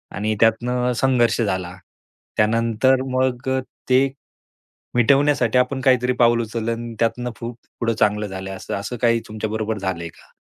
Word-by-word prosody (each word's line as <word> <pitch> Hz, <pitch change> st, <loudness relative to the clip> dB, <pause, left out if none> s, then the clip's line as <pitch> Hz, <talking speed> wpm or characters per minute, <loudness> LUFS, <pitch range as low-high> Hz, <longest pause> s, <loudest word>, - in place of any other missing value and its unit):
आणि 110 Hz, +2 st, -1 dB
त्यातनं 125 Hz, +3 st, +2 dB
संघर्ष 125 Hz, -3 st, +3 dB
झाला. 95 Hz, -4 st, -2 dB, 0.6 s
त्यानंतर 115 Hz, +4 st, +2 dB
मग 130 Hz, 0 st, 0 dB, 0.4 s
ते, 130 Hz, +2 st, +5 dB, 0.9 s
मिटवण्यासाठी 130 Hz, -1 st, +3 dB
आपण 130 Hz, +1 st, +1 dB
काहीतरी 125 Hz, -1 st, +3 dB
पाऊल 120 Hz, 0 st, +4 dB
उचललं 115 Hz, 0 st, -3 dB
आणि 115 Hz, 0 st, -6 dB
त्यातनं 120 Hz, +1 st, 0 dB
फु 115 Hz, 0 st, -5 dB, 0.3 s
पुढं 115 Hz, -1 st, +1 dB
चांगलं 105 Hz, 0 st, +2 dB
झालंय 95 Hz, 0 st, -6 dB
असं, -, -, -7 dB
असं 100 Hz, +5 st, -4 dB
काही 115 Hz, -1 st, +3 dB
तुमच्याबरोबर 110 Hz, 0 st, -3 dB
झालंय 95 Hz, -4 st, -3 dB
का? -, -, -20 dB
115 Hz, 140 wpm, -21 LUFS, 110-125 Hz, 0.9 s, ते